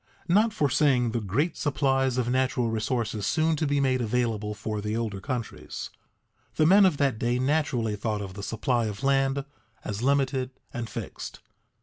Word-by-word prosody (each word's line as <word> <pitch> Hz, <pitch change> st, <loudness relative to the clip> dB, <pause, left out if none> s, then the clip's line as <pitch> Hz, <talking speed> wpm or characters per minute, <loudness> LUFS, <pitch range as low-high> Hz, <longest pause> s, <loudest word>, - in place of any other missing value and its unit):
_ -, -, +3 dB
Not 220 Hz, +3 st, +4 dB
foreseeing 140 Hz, -, +2 dB
the 115 Hz, 0 st, -1 dB
great 140 Hz, -, 0 dB
supplies 135 Hz, -3 st, +1 dB
of 125 Hz, -2 st, +1 dB
natural 125 Hz, -2 st, +1 dB
resources 110 Hz, -1 st, -1 dB
soon 160 Hz, 0 st, +2 dB
to 155 Hz, -, 0 dB
be 145 Hz, 0 st, +1 dB
made 130 Hz, -2 st, +2 dB
available 110 Hz, -3 st, -1 dB
for 105 Hz, 0 st, -4 dB
the 105 Hz, +2 st, -2 dB
older 105 Hz, -4 st, -3 dB
countries, 125 Hz, -3 st, -5 dB, 0.6 s
the 155 Hz, -, +3 dB
men 195 Hz, +4 st, +7 dB
of 160 Hz, -6 st, 0 dB
that 135 Hz, -6 st, +1 dB
day 120 Hz, +1 st, +1 dB
naturally 130 Hz, -5 st, 0 dB
thought 105 Hz, 0 st, -2 dB
of 95 Hz, -1 st, -7 dB
the 100 Hz, -, -7 dB
supply 115 Hz, +3 st, 0 dB
of 105 Hz, +2 st, -6 dB
land 135 Hz, 0 st, +2 dB, 0.4 s
as 105 Hz, +1 st, -3 dB
limited 135 Hz, -1 st, +1 dB, 0.2 s
and 120 Hz, -2 st, -4 dB
fixed. -, -, -7 dB
125 Hz, 175 wpm, -27 LUFS, 110-140 Hz, 0.6 s, men